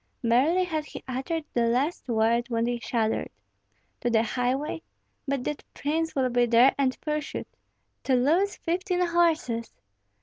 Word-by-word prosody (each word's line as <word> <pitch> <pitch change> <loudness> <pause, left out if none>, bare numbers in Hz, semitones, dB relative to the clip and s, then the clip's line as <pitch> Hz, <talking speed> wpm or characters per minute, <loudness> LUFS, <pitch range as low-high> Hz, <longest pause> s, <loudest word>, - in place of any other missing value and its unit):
Barely 270 +11 +3
had 315 -4 -2
he - - -9
uttered 270 +5 -3
the 235 -1 +2
last 265 +9 0
word 230 +1 +2
when 230 -1 0
he 240 0 -1
shuddered, 225 -2 -1 0.7
"To 240 - 0
the 225 -1 +3
highway? 255 +7 -1 0.5
But 275 -2 -1
that 295 +2 -4
prince 320 +3 -1
will 260 -2 +2
be 245 0 +3
there, 240 +3 +6
and 265 -2 0
pursuit. 300 -1 -3 0.6
To 265 - +3
lose 330 +11 +2
fifteen 360 +1 0
horses!" 330 -9 +1
265 Hz, 145 wpm, -27 LUFS, 240-320 Hz, 0.7 s, there